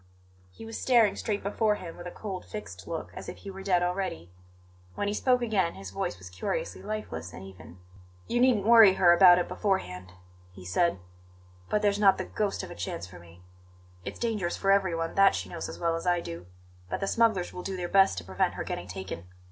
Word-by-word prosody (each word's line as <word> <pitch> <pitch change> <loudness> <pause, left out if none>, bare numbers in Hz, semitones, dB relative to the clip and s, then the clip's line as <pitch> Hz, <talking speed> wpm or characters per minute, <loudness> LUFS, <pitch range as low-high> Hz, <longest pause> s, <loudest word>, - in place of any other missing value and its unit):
He 90 - -12
was 225 0 -6
staring 230 -6 +4
straight 205 -1 -3
before 210 +2 +1
him 170 -4 -8
with 175 - -8
a - - -6
cold, 195 -2 -6
fixed 95 - -8
look, 165 -1 -5
as - - -8
if - - -8
he 195 - -9
were 195 0 -9
dead 185 -2 +2
already. 175 - -3 0.6
When 205 - -2
he 205 - 0
spoke 250 +2 +2
again 195 -7 0
his 95 -1 -8
voice 95 - -3
was 90 0 -12
curiously - - -3
lifeless 90 - -5
and 95 - -9
even. 95 -2 -12 0.5
"You 240 - 0
needn't 245 -6 +3
worry 225 -4 +8
her 175 -2 +6
about 175 0 +8
it 180 - 0
beforehand," 90 - -2 0.4
he 90 0 -13
said; 170 - +1 0.7
"but 210 0 +1
there's 205 0 +2
not 200 -2 +5
the - - -3
ghost 210 -2 -2
of - - -8
a - - -8
chance 85 -1 -4
for 90 0 -12
me. 85 +1 -17 0.6
It's - - -6
dangerous 215 -7 -1
for 195 - +2
everyone; 170 -4 +1
that 195 0 +5
she - - -4
knows 170 - -5
as - - -8
well 165 -1 0
as 165 +2 -5
I 175 0 +3
do; 85 - -8 0.4
but - - -2
the - - -1
smugglers 215 -4 +1
will 180 - -6
do 190 +1 -4
their 175 -1 -3
best 190 - +4
to 90 - -4
prevent 95 +1 -1
her - - -3
getting 85 - -5
taken. 95 -2 -7
180 Hz, 220 wpm, -28 LUFS, -, 0.7 s, worry